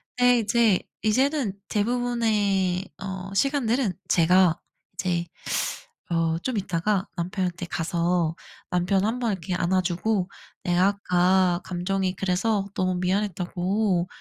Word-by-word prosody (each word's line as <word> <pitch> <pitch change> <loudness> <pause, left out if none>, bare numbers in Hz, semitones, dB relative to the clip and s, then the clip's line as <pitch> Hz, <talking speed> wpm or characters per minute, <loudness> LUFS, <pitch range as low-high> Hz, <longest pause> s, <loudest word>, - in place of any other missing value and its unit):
근데 245 0 +5
이제 220 -2 +3 0.2
이제는 250 -2 +1
대부분의 210 -5 +1
어 190 0 -6
시간들은 245 -2 +1 0.2
제가 180 0 +4 0.3
이제 175 -2 -1 0.9
어 165 -1 +1
좀 255 -4 -1
있다가 190 +1 -1
남편한테 180 0 -2
가서 170 -1 0 0.3
남편 190 +2 +1
1 225 +3 0
번 235 -3 0
이렇게 185 -1 -3
안아 185 +1 +2
주고 185 +2 -1 0.3
내가 180 +1 +3
아까 185 -2 +2
감정이 185 +1 -1
그래서 195 +2 0
너무 185 0 +1
미안했다고 185 0 0
190 Hz, 245 characters per minute, -25 LUFS, 180-215 Hz, 0.9 s, 근데